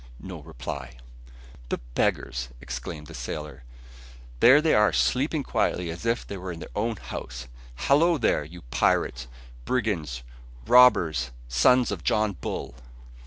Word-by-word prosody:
No - - -8
reply. 65 0 -7 0.7
"The - - -1 0.2
beggars," 60 +1 -1
exclaimed 75 +3 -6
the - - -11
sailor. 75 -2 -6 0.8
"There 130 +5 +8
they 160 +1 +2
are 105 0 +5
sleeping 145 +3 +1
quietly 90 -8 -1
as 85 +8 -6
if 115 +1 0
they 100 - -6
were 95 0 -6
in 85 - -7
their - - -10
own 115 +2 0
house. 60 - -7 0.3
Hallo 150 - +3
there, 110 - +1
you 85 +4 -12
pirates, - - +1 0.4
brigands, 80 - -2 0.4
robbers, 85 - +5 0.2
sons 120 - +4
of 95 -6 -5
John 110 -1 +2
Bull!". 80 -7 -5
85 Hz, 135 wpm, -26 LUFS, -, 0.8 s, There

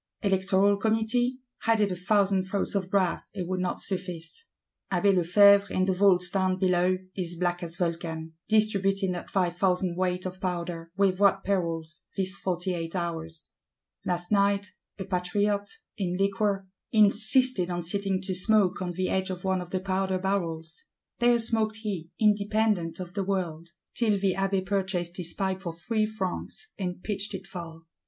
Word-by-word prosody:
Electoral 195 0 +3
Committee? 225 +4 +1 0.2
Had 225 -1 +2
it 205 -2 +2
a - - -2
thousand 195 0 +2
throats 195 +1 -2
of 190 -2 -1
brass, 190 -3 0
it 180 -3 -3
would 185 0 -2
not 180 0 -2
suffice. 185 - -5 0.5
Abbé 195 +2 +3
Lefevre, 200 +3 +5
in 185 - +1
the 190 - +1
Vaults 180 -2 +3
down 185 -1 +1
below, 185 -1 +2 0.2
is 175 -2 -4
black 175 0 -1
as 170 -1 -5
Vulcan, 165 -2 -3 0.2
distributing 195 -3 +2
that 175 -1 -5
"five 180 -2 0
thousand 180 -1 +1
weight 180 0 -1
of 185 0 -6
Powder;" 170 -2 -3
with 195 -2 +2
what 195 -1 +4
perils, 170 -4 -2
these 190 -1 -1
eight - - -9
and - - -8
forty 175 -2 -2
hours! 165 -2 -5 0.5
Last 175 +1 -3
night, 200 -1 +2 0.3
a 190 - -5
Patriot, 200 +3 0 0.3
in 180 -3 -2
liquor, 195 0 0 0.3
insisted 215 -1 +5
on 175 -1 -2
sitting 195 +2 -1
to 190 0 -2
smoke 195 0 +3
on 180 -1 -3
the 185 +1 -1
edge 190 0 0
of 180 -1 -5
one 190 -1 0
of 175 - -8
the 185 - -1
Powder 190 0 -1
barrels; 165 -4 -3 0.3
there 240 0 +5
smoked 225 -1 +2
he, 200 -7 -5
independent 210 -5 +1
of 180 -1 -7
the 200 -1 -1
world,—till 185 +3 -2
the 195 -1 +1
Abbé 195 0 0
"purchased 190 -3 -1
his 170 -2 -3
pipe 190 -1 -1
for 170 -3 -4
three 215 +5 0
francs," 215 - -5
and 180 -1 -4
pitched 205 -1 -2
it 190 0 -7
far. 170 -4 -9
190 Hz, 165 wpm, -27 LUFS, 175-200 Hz, 0.5 s, Lefevre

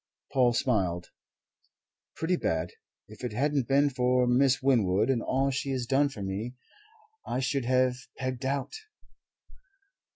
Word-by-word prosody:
Paul 125 -3 +4
smiled. 95 -9 0 1.0
"Pretty 170 +3 0
bad. 80 - -1 0.4
If 110 +3 -13
it 120 -3 -3
hadn't 140 +1 0
been 140 +1 +3
for 125 -1 +2
Miss 130 +2 +3
Winwood 110 -4 +2
and 120 -3 0
all 135 +3 0
she 140 +1 -3
has 125 -2 -2
done 140 +3 +2
for 105 -7 -7
me, 105 +6 -4 0.7
I 125 - -2
should 135 -1 -1
have 130 0 +2 0.2
pegged 130 -1 -4
out." 135 +1 -2
130 Hz, 135 wpm, -28 LUFS, 115-135 Hz, 1.0 s, Paul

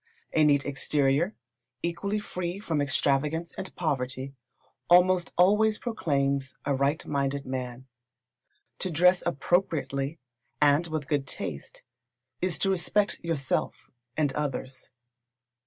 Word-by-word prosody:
A 155 - +4
neat 145 -2 +4
exterior, 145 +5 +1 0.5
equally 170 +5 -1
free 180 -3 -4
from 165 -8 -1
extravagance 145 +4 0
and 190 - -7
poverty, 135 -4 -2 0.6
almost 180 0 +5
always 210 +4 +4
proclaims 140 - -1
a 140 - +1
right 140 +3 0
minded 140 -1 -1
man. 130 -1 -5 0.9
To 185 - -1
dress 180 +3 +4
appropriately, 145 -3 0 0.4
and 150 +3 +4
with 155 -3 -3
good 145 -3 0
taste, 70 -5 -5 0.6
is 180 -2 +1
to 195 - +2
respect 195 +2 +1
yourself 155 -6 -2 0.3
and 145 -3 +1
others. 135 -2 -4
150 Hz, 110 wpm, -28 LUFS, 140-175 Hz, 0.9 s, almost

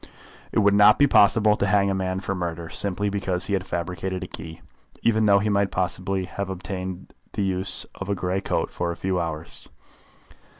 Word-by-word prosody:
It - - -2
would 100 -2 +4
not 105 +1 +7
be 145 - +5
possible 105 -4 +5
to 100 - 0
hang 100 0 +3
a - - 0
man 95 0 -2
for 95 - -4
a - - -1
murder 85 -2 -4
simply 100 +2 -1
because 95 -3 -1
he 100 - -2
had 95 -1 -1
fabricated 90 +2 -3
a - - -6
key, 80 0 -9 0.4
even 110 -2 +3
though 100 -1 +6
he 100 +2 0
might 100 -1 +2
possibly 95 +1 -1
have 100 +1 -5
obtained 95 0 -6 0.2
the 100 - -1
use 95 0 +1
of 100 - -7
a 100 - +1
grey 90 +1 -1
coat - - -1
for 85 -1 -2
a 85 - -6
few 95 +1 -1
hours. 80 -1 -3
95 Hz, 205 wpm, -24 LUFS, 90-100 Hz, 0.4 s, not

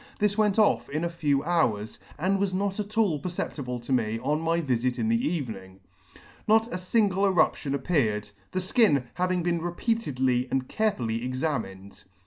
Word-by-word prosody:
This 210 -1 +1
went 210 -2 +2
off 215 -2 +3
in 155 +3 -2
a 170 - 0
few 145 -5 0
hours, 120 -11 0 0.2
and 190 +4 +1
was 195 -2 0
not 195 +1 -1
at 210 +1 -5
all 195 -10 +3
perceptible 140 -7 -4
to 125 +3 -3
me 115 -3 +1
on 150 +4 0
my 165 +1 +1
vifit 130 -4 0
in 225 - 0
the 230 +4 +1
evenings 95 - -4 0.7
Not 225 +2 +3
a - - -1
fingle 195 0 +1
eruption 160 -6 +2
appeared, 130 - 0 0.2
the 185 - -4
fkin 185 - +3
having 180 -1 0
been 170 -1 0
repeatedly 145 - 0
and 130 -1 -1
carefully 120 - -1
examined. 125 -8 -4
165 Hz, 165 wpm, -27 LUFS, 125-195 Hz, 0.7 s, off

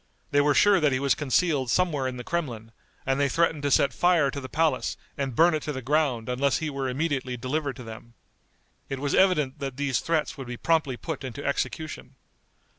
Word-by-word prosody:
They 145 - +4
were 145 0 +2
sure 205 +5 +5
that 150 -3 +3
he 130 - 0
was 140 0 +2
concealed 145 -2 +1
somewhere 150 -4 +1
in 130 -1 -4
the 125 - -6
Kremlin, 120 -9 -4 0.3
and 135 +1 0
they 140 -1 +2
threatened 165 0 +1
to 145 - 0
set 140 - +3
fire 170 -6 +3
to 140 - -5
the 130 - -8
palace 155 -4 0 0.2
and 135 -3 -3
burn 170 +4 +5
it 155 - -1
to 150 - -4
the 130 -2 -5
ground 135 -4 +1
unless 130 +2 +1
he 160 -2 -3
were 135 -1 -2
immediately 130 -2 -2
delivered 135 +3 -2
to 130 - -9
them. 115 +1 -11 0.7
It 135 - -3
was 140 +1 -2
evident 155 -7 +3
that 135 -2 -5
these 140 -3 0
threats 160 -3 -1
would 135 - -6
be 120 0 -6
promptly 155 -5 +1
put 160 0 -5
into 130 +2 -6
execution. 155 +2 -3
140 Hz, 210 wpm, -26 LUFS, 130-155 Hz, 0.7 s, sure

